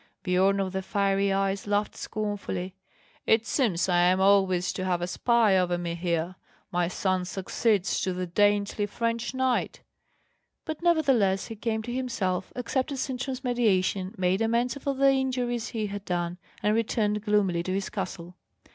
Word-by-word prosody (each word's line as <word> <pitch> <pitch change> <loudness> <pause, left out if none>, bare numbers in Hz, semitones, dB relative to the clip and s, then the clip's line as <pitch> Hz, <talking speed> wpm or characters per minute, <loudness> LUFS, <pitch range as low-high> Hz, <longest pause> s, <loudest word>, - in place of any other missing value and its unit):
Biorn 190 +2 +2
of 190 -1 -2
the 190 - -1
Fiery 195 0 +1
Eyes 195 +1 0
laughed 205 +1 0
scornfully: 205 -3 -4 0.5
"It 220 0 +4
seems 215 - +1
I 175 -2 +3
am 180 +1 +4
always 190 -2 +3
to 185 - -4
have 180 -2 0
a 175 - -1
spy 225 +2 +3
over 180 -1 +2
me 175 -1 -3
here; 170 +1 -2 0.3
my 175 0 +1
son 185 0 0
succeeds 190 +2 0
to 190 - 0
the 180 0 -3
dainty 205 +3 +1
French 230 +3 -2
knight!" 260 -1 0 0.8
But 315 0 -5
nevertheless 270 - +2
he 225 - -6
came 220 0 -2
to 240 +1 -5
himself, 235 -8 -2
accepted 260 +3 -2
Sintram's 260 0 -3
mediation, 200 -5 +1
made 185 +2 +1
amends 235 +2 +1
for 280 0 -3
the 275 +1 +5
injuries 250 -3 -1
he 220 -2 -3
had 205 -1 -5
done, 175 0 -2 0.2
and 210 - +3
returned 215 -2 0
gloomily 205 -5 +2
to 185 - -4
his 195 +1 -2
castle. 180 -3 -5
200 Hz, 160 wpm, -27 LUFS, 185-235 Hz, 0.8 s, the